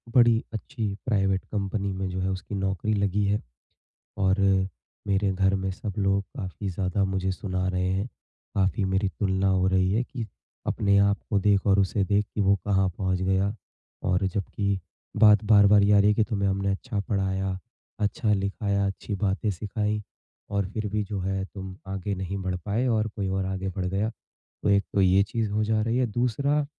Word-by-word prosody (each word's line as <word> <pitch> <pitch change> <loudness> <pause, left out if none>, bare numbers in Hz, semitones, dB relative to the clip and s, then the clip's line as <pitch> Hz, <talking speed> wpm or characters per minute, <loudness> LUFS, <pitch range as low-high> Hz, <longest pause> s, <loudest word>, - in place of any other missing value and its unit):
बड़ी 120 -2 +5
अच्छी 115 0 -4 0.2
private 95 -4 +1
company 100 -1 -2
में 95 0 -3
जो 90 0 -4
है 95 - 0
उसकी 95 +2 -4
नौकरी 95 +2 -1
लगी 100 0 +1
है, 100 +1 +1 0.8
और 95 0 +2 0.7
मेरे 100 0 +2
घर 95 +1 +2
में 95 0 -2
सब 100 +2 -5
लोग 100 0 +2
काफ़ी 95 -2 -4
ज़्यादा 95 +2 -1
मुझे 95 0 -1
सुना 95 -1 -2
रहे 90 0 0
हैं। 95 +2 -1 0.5
काफ़ी 95 +1 +1
मेरी 95 +1 +1
तुलना 95 -1 +1
हो 95 -1 +3
रही 95 0 +2
है 115 +4 +2
कि 120 -2 -6 0.4
अपने 100 -1 +2
आप 100 0 +3
को 105 - +2
देख 100 0 +2
और 100 0 +5
उसे 100 +1 +1
देख 100 +2 +2
कि 105 - +1
वो 100 0 +4
कहाँ 95 -1 +3
पहुँच 95 -2 0
गया। 95 +2 +1 0.6
और 90 +1 +2
जब 95 +1 -1
कि 100 -2 0 0.4
बात 105 -1 +6
बार-बार 105 -1 +6
ये 100 +1 +4
आ 100 - +7
रही 105 - +5
है - - +4
कि 110 - +3
तुम्हें 100 -3 -1
हमने 100 0 0
अच्छा 105 +2 -3
पढ़ाया, 95 -1 0 0.4
अच्छा 105 +1 +1
लिखाया, 100 0 0
अच्छी 100 +1 -4
बातें 100 +1 0
सिखाई 105 +3 -2 0.5
और 100 -1 0
फिर 110 -1 -2
भी 105 -1 +1
जो 100 0 -4
है 95 +1 -1
तुम 95 -1 -8
आगे 95 +1 -3
नहीं 95 +1 -4
बढ़ 95 -1 -1
पाए 110 +5 0
और 110 -2 +1
कोई 100 -3 -2
और 95 0 -1
आगे 95 0 -2
बढ़ 95 0 -3
गया। 100 +4 0
तो 110 - -8
एक 100 0 +4
तो 100 - +3
ये 95 +1 +5
चीज़ 110 +1 -2
हो 105 +1 +1
जा 110 0 +1
रही 115 +2 0
है, 130 - +3
दूसरा 125 +6 0
100 Hz, 195 wpm, -26 LUFS, 95-105 Hz, 0.8 s, आ